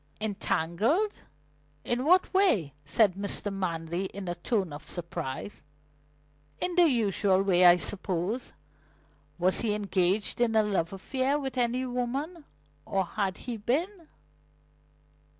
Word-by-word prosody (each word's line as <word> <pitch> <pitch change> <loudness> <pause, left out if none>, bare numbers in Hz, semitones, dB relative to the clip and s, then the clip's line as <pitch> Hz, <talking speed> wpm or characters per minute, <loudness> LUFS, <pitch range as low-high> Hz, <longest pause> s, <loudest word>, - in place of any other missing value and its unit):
"Entangled? 215 - 0 0.7
In 245 +2 -1
what 365 +5 +4
way?" 345 - +3
said 190 +7 +3
Mr. 200 +1 -1
Manley 170 -1 -3
in 190 0 -7
a 175 - -1
tone 190 -3 -1
of 145 - -7
surprise. 170 0 -5 1.0
"In 360 - -1
the 345 -2 +5
usual 200 -5 +2
way, 180 -2 +4
I 175 0 +8
suppose. 190 +5 -3 0.9
Was 185 +1 +2
he 215 -3 +1
engaged 200 +1 0
in 230 -2 +2
a 220 - +5
love 190 -5 -1
affair 260 +8 -1
with 270 -3 -4
any 250 +1 0
woman, 270 +7 -3 0.4
or 195 -1 -1
had 195 0 -2
he 240 -2 -3
been?" 325 - -2
205 Hz, 125 wpm, -28 LUFS, 185-255 Hz, 1.0 s, I